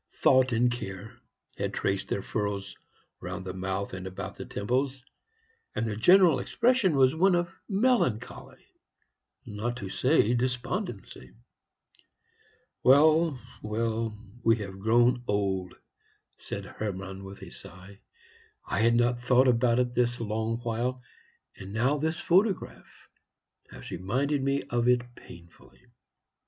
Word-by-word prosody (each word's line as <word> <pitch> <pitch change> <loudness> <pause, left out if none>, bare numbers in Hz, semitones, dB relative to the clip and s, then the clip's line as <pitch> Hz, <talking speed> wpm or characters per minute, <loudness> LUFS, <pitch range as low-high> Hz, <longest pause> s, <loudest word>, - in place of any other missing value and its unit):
Thought 130 -1 +4
and 120 +1 +2
care 100 -3 -7 0.4
had - - -2
traced 95 0 -1
their 100 - -2
furrows 100 -2 -3 0.4
round 95 - -6
the 90 - -5
mouth 95 +1 -3
and 95 0 -6
about 95 - -7
the - - -8
temples, 130 +5 -2 0.7
and - - -1
the 110 -2 -2
general 175 - +5
expression 230 - +2
was 130 -1 +4
one 180 +3 +3
of 175 0 -1 0.2
melancholy, 195 - 0 0.8
not 115 +4 -4
to 100 -5 -6
say 120 +4 +2
despondency. 125 - -3 1.5
"Well, 155 +2 +5 0.2
well, 110 0 -2 0.3
we 115 0 +5
have 100 -3 -7
grown 120 +4 +3
old," 95 -3 -1 0.6
said - - -6
Hermann, 95 -2 -6
with 95 0 -10
a - - -10
sigh. 95 +2 -12 0.7
"I - - -2
had 115 +1 +4
not 120 0 +2
thought 125 +1 +4
about 120 -1 +3
it 125 -1 0
this 120 0 +1
long 110 0 -2
while; 120 +2 -2 0.5
and 95 0 -9
now 130 +7 +1
this 160 +3 -2
photograph 190 +3 0 0.6
has - - -11
reminded 135 - -1
me 140 +1 0
of 120 0 -1
it 120 0 +2
painfully." 85 +4 -16
120 Hz, 125 wpm, -28 LUFS, 100-130 Hz, 1.5 s, general